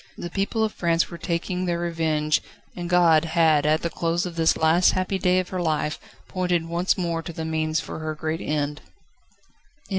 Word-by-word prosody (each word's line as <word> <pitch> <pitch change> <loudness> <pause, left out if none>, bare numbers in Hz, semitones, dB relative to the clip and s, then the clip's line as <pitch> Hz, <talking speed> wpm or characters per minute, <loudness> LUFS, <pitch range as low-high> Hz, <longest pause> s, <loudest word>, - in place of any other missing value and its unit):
The 175 - -6
people 205 +4 0
of 220 - 0
France 170 -2 0
were 170 - -8
taking 180 +2 -2
their 175 -1 0
revenge, 160 -3 0 0.3
and 175 -1 -5
God 170 -3 +5
had 160 -3 +3
at 155 +1 +2
the 170 - 0
close 170 +1 -1
of 175 -2 -6
this 165 -1 +2
last 160 +3 +4
happy 185 +1 -1
day 180 0 +3
of 185 -1 -1
her 185 -1 -3
life 155 -2 -1 0.3
pointed 180 -3 0
once 170 +2 0
more 170 -3 -1
to 170 - -7
the 160 0 -5
means 160 0 0
for 160 - -6
her 155 0 -4
great 155 +1 -3
end. 150 0 -2
165 Hz, 190 wpm, -24 LUFS, 160-175 Hz, 0.3 s, God